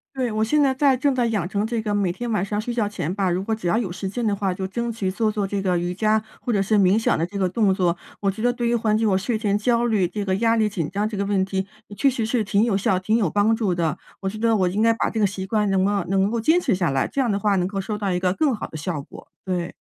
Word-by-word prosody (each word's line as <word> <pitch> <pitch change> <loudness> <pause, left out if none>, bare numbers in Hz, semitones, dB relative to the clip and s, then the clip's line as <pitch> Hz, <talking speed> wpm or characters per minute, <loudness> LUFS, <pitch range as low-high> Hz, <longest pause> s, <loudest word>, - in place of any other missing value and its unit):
对， 255 -2 -1
我 215 0 0
现 300 +7 +2
在 275 -2 +3
在 270 0 +3
正 275 +1 +1
在 245 -2 +1
养 205 -7 -1
成 200 +2 -1
这 230 0 -2
个 210 -2 -1
每 200 -3 +1
天 240 +7 -5
晚 210 -5 0
上 205 +1 -2
睡 240 +3 -3
觉 225 -4 0
前 180 -5 -3
吧， 195 -2 +1
如 180 +2 0
果 220 +3 -1
只 220 - -11
要 215 - +2
有 225 -5 -1
时 190 +2 -5
间 240 +4 -3
的 205 - +1
话， 195 -2 -1
就 190 +1 -4
争 235 +4 -3
取 215 -4 -2
做 215 +3 0
做 205 -2 -2
这 200 0 -2
个 185 -2 +1
瑜 175 +1 -2
伽， 215 +3 +2 0.2
或 245 - -2
者 205 -3 +2
是 210 +2 +1
冥 195 +2 +4
想 - - +1
的 165 - 0
这 200 +3 -7
个 190 - +2
动 195 +1 +2
作。 180 -3 +1 0.2
我 200 - 0
觉 195 +3 -4
得 245 - +4
对 240 -1 -2
于 235 - +2
缓 220 -2 +1
解 225 - +1
我 195 -3 +3
睡 215 +4 -1
前 205 -2 +1
焦 235 +2 +1
虑 215 -6 +2
这 205 +2 -4
个 190 -1 +1
压 230 +1 +2
力 215 -1 +3
紧 175 -7 -3
张 205 +2 0
这 215 - -5
个 200 - -1
问 195 -1 +1
题， 190 0 -2 0.2
呃， 205 - -10
确 275 +7 +3
实 240 -4 -2
是 225 0 0
挺 210 +1 +2
有 225 -4 +1
效， 190 -1 +1
挺 215 +4 0
有 215 -7 +2
帮 205 +5 +2
助 215 -5 0
的。 165 -3 -1 0.2
我 195 - -4
觉 215 - -7
得 230 +1 +2
我 190 -4 +2
应 195 +4 -1
该 230 +1 +5
把 - - 0
这 - - -5
个 215 - +3
习 190 -1 -3
惯， 210 0 +1
能 190 -1 +2
够 200 -1 +1
能 195 +1 +2
够 230 +1 -1
坚 320 +9 +4
持 255 - +1
下 175 -3 0
来， 135 -1 0
这 275 - -1
样 245 -4 +1
的 200 - 0
话 205 0 +2
能 180 -2 +1
够 195 +1 -3
收 210 +2 -3
到 200 -2 -1
一 180 - 0
个 180 0 +1
更 285 +5 +1
好 215 - -4
的 - - -13
效 155 0 -3
果。 - - -13 0.2
对。 180 -2 -2
205 Hz, 350 characters per minute, -23 LUFS, 190-225 Hz, 0.2 s, 该